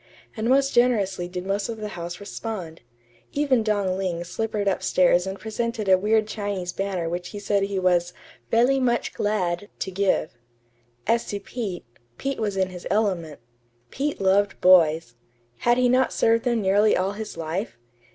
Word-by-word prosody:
And 225 +1 -1
most 275 +1 +3
generously 205 -7 +2
did 180 0 -6
most 200 +2 -1
of 225 - -4
the 210 -1 -5
house 175 -2 -6
respond. 200 -5 -6 0.5
Even 280 -4 +2
Dong 200 -3 0
Ling 175 -3 -2
slippered 210 +3 -3
up 195 - +1
stairs 180 -1 +3
and 195 +1 -5
presented 225 0 -3
a 190 - +7
weird 215 +3 +2
Chinese 200 -4 -3
banner 195 -4 -2
which 175 +1 -3
he 205 - -7
said 200 0 +1
he 195 0 -1
was 180 -1 +2 0.4
"velly 250 +4 +3
much 240 -2 0
glad" 205 -2 -1
to 190 - -4
give. 190 -4 0 0.7
As 230 +1 +2
to 205 - -3
Pete 200 - -5 0.3
Pete 275 0 -3
was 205 -3 -2
in 190 -1 +1
his 180 -1 -8
element. 185 - -1 0.5
Pete 290 +2 -2
loved 195 +1 +2
boys. 165 -7 +5 0.5
Had 240 0 +3
he 250 0 +4
not 255 +1 +3
served 230 +1 +2
them 235 -3 +1
nearly 205 +3 +4
all 190 +2 0
his 210 -3 -7
life? 165 - -4
200 Hz, 170 wpm, -24 LUFS, 180-225 Hz, 0.7 s, a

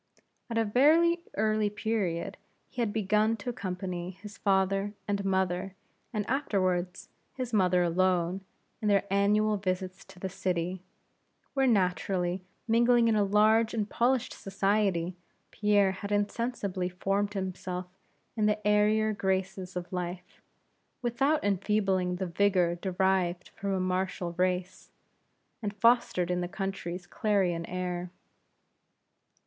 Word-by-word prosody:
At 230 - -2
a 225 - +3
very 320 +10 +4 0.2
early 215 0 +2
period 200 -4 -2 0.3
he 245 - -4
had 225 -3 0
begun 215 +1 +2
to 235 +4 -4
accompany 180 -5 -4
his 200 +3 -10
father 195 +1 +1
and 200 -1 -1
mother 190 0 0 0.4
and 210 -4 -2
afterwards 185 -9 -1 0.3
his 255 -3 -4
mother 180 -3 +3
alone 180 +1 +1 0.4
in 215 - -1
their 200 -1 +4
annual 210 +2 +3
visits 185 -1 -3
to - - -16
the 190 - -3
city; 185 -1 -2 0.7
where 270 -1 +2
naturally 180 -3 +1 0.2
mingling 235 +1 +4
in 220 - +3
a 210 - +3
large 215 +3 +3
and 210 -2 0
polished 250 +1 +1
society, 195 -3 0 0.3
Pierre 205 -2 +3
had 200 +2 -6
insensibly 205 -3 -1
formed 195 +3 -1
himself 185 -1 -4 0.5
in 215 -2 +2
the 210 -1 0
airier 215 +1 +3
graces 190 -1 -2
of 180 +1 -5
life, 180 0 -5 0.6
without 270 +6 +1
enfeebling 195 -2 +1
the 190 +1 -3
vigor 180 -1 +2
derived 180 0 0
from 200 0 -4
a 190 - 0
martial 185 -1 -1
race, 180 0 -1 0.7
and 205 -2 -3
fostered 220 -5 +3
in 180 0 0
the 175 - -2
country's 190 -2 -4
clarion 185 -5 0
air. 180 -1 -3
195 Hz, 125 wpm, -29 LUFS, 180-210 Hz, 0.7 s, very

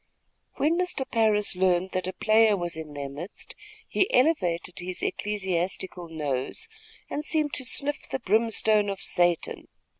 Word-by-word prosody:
When 325 +4 +1
Mr. 355 -7 -1
Parris 215 -4 +2
learned 185 0 +2
that 185 -1 -2
a 185 - -3
player 215 0 +4
was 175 -2 -3
in 155 -2 -8
their 140 -1 -4
midst, 150 +9 -7 0.3
he 385 - +1
elevated 180 - +1
his 180 +1 -4
ecclesiastical 185 -3 -2
nose, 145 -5 -3 0.4
and 295 - -4
seemed 305 -2 0
to 260 - +2
sniff 290 +3 0
the - - -1
brimstone 220 -2 +2
of 195 -1 -4
Satan. 175 -1 +1
195 Hz, 145 wpm, -26 LUFS, 175-230 Hz, 0.4 s, player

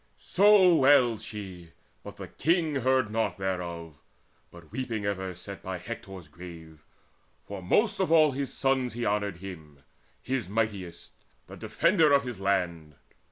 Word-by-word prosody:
So 195 -1 +5
wailed 130 -6 +4
she; 95 -5 -8 0.3
but - - -9
the - - -8
King 160 -3 0
heard 130 -3 +1
naught 110 -1 -1
thereof, 85 -5 -4 0.5
But 85 -2 -16
weeping 115 -5 -3
ever 95 -2 -3
sat 100 +3 -9
by 95 0 -5
Hector's 95 -3 -8
grave, 80 -2 -12 0.6
For 100 -1 -7
most 205 - +1
of 190 -4 0
all 155 -3 +6
his 135 0 -4
sons 130 -2 0
he 120 +1 -3
honoured 100 -3 -1
him, 80 -7 -11 0.4
His 130 -7 -3
mightiest, 100 -5 -3 0.3
the - - -11
defender 150 - +2
of 140 0 +4
his 125 -5 -6
land. 85 -6 -1
105 Hz, 145 wpm, -28 LUFS, 90-130 Hz, 0.6 s, all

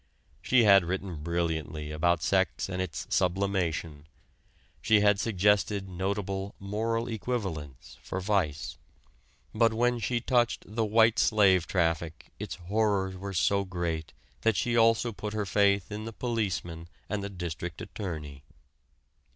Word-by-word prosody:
She 125 -2 +4
had 100 -3 +7
written 90 -2 -4
brilliantly 80 -2 -2
about 80 +1 +1
sex 95 +1 +1
and 95 -1 -3
its 90 -3 -4
"sublimation," 90 -5 -1 0.7
she 110 -2 +4
had 105 -1 +4
suggested 105 -1 +1
notable 95 +1 -3
"moral 115 +4 -2
equivalents" 95 - -5
for 95 - -4
vice, 90 -7 -1 0.7
but 115 0 +3
when 120 +1 +2
she 120 +1 0
touched 120 -1 +1
the 110 +2 -1
white 110 +1 +4
slave 95 -5 +4
traffic 80 -3 -1
its - - -5
horrors 95 0 0
were 95 +1 -6
so 100 +3 +2
great 85 -4 -3 0.3
that 115 -2 +2
she 120 -1 0
also 115 +1 +4
put 105 0 -6
her 105 -1 -1
faith 100 0 +2
in 105 +1 -5
the 115 - -6
policeman 95 -9 -3 0.2
and 100 0 -3
the 100 - -4
district 85 -3 -5
attorney. 75 -8 -6
95 Hz, 135 wpm, -29 LUFS, 85-110 Hz, 0.7 s, had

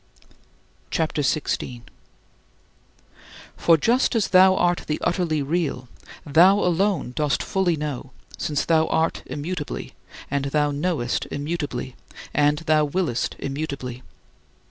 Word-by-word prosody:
CHAPTER 160 -2 -1
XVI 145 +2 0
19. 120 -2 -8 1.7
For 165 -1 +4
just 240 - +2
as 220 -4 +1
thou 190 0 +6
art 175 -1 +1
the 150 - -1
utterly 170 -4 0
Real, 145 -5 -2 0.4
thou 175 +7 +6
alone 180 -7 +1
dost 150 -2 0
fully 190 -3 +1
know, 145 -4 -5 0.3
since 145 -2 -2
thou 160 -1 +3
art 160 +1 0
immutably, 150 +1 -5 0.4
and 140 -1 0
thou 150 +1 +1
knowest 145 -5 -1
immutably, 145 -4 -4 0.4
and 150 0 +3
thou 155 0 +4
willest 150 -4 -1
immutably. 135 -3 -5
155 Hz, 115 wpm, -23 LUFS, 140-175 Hz, 1.7 s, thou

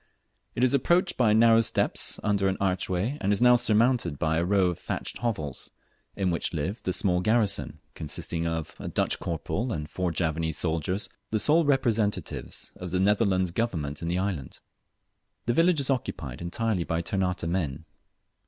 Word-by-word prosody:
It 120 - 0
is 130 - +3
approached 175 +7 +2
by 120 -4 +3
narrow 115 +1 +6
steps 115 - 0
under 100 -2 +1
an 95 - 0
archway, 95 +6 -1
and 100 - +1
is 100 - +3
now 125 0 +6
surmounted 115 - +2
by 80 +2 +1
a - - +1
row 95 +1 +3
of 85 - -8
thatched - - -4
hovels, 80 - -2 0.5
in 95 -2 0
which 85 - -1
live 90 +8 -3
the 95 - -1
small 90 -2 +1
garrison, 110 +1 +1 0.2
consisting 80 +2 -3
of, 80 -2 -3
a - - -6
Dutch - - 0
corporal 85 +8 -3
and 75 -6 -3
four 90 +3 -2
Javanese 80 -1 -1
soldiers, 85 +4 0 0.2
the 110 - 0
sole 155 +10 +4
representatives 115 -7 -1
of 90 - -6
the 90 +1 -1
Netherlands 95 -2 +2
Government 80 -9 -2
in 85 - -3
the 85 +1 0
island. 90 -9 -3 0.9
The 120 - +1
village 165 +2 +3
is 140 0 +1
occupied 70 - -3
entirely 95 +2 -1
by 85 +1 -2
Ternate 90 -3 -1
men. 80 -4 -2
95 Hz, 170 wpm, -27 LUFS, 85-115 Hz, 0.9 s, narrow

